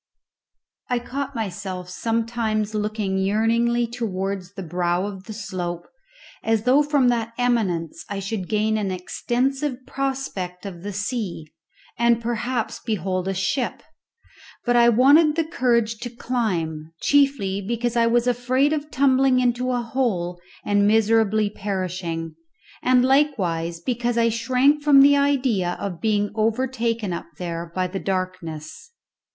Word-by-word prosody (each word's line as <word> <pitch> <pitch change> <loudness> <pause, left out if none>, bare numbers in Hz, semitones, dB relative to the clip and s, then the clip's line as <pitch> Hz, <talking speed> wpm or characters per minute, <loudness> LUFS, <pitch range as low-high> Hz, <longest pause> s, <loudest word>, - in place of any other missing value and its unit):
I 250 - +1
caught 275 +3 -4
myself 190 -4 -4
sometimes 225 +1 -1
looking 210 -2 -1
yearningly 230 +4 +2
towards 200 -5 -4
the 195 - -5
brow 175 +2 0
of 195 -2 -7
the 220 - -7
slope, 180 -4 -5 0.6
as 225 -1 +1
though 260 +4 +5
from 290 -4 +3
that 230 -1 -1
eminence 195 -11 0
I 200 - -3
should 195 -1 -4
gain 215 0 +1
an 200 -2 -1
extensive 255 +8 -2
prospect 260 -10 -4
of 180 -4 -7
the 205 +2 -5
sea 200 -6 -4 0.5
and 235 -1 +4
perhaps 235 0 -2
behold 190 -4 -2
a 195 - -1
ship; 235 +7 -1 0.8
but 245 -1 +2
I 235 0 +6
wanted 290 +6 +5
the 330 - +2
courage 235 -8 +1
to 245 - -5
climb, 175 -11 -2
chiefly 275 -9 +2
because 235 +3 -2
I 230 -1 +4
was 240 +1 +2
afraid 250 +4 +2
of 300 -1 -3
tumbling 265 -2 +3
into 250 0 +1
a 245 -1 0
hole 190 -9 -1 0.2
and 205 0 +3
miserably 215 -1 +3
perishing, 185 -5 -3 0.5
and 250 0 +4
likewise 190 - +1
because 240 +4 -1
I 230 0 +4
shrank 255 +6 +2
from 290 -2 +6
the 285 +1 +6
idea 260 -11 +1
of 185 -4 -5
being 205 -2 +1
overtaken 230 -2 0
up 170 - -5
there 170 -1 -5
by 185 0 +1
the 185 +2 -4
darkness. 185 -5 -4
225 Hz, 135 wpm, -23 LUFS, 190-250 Hz, 0.8 s, I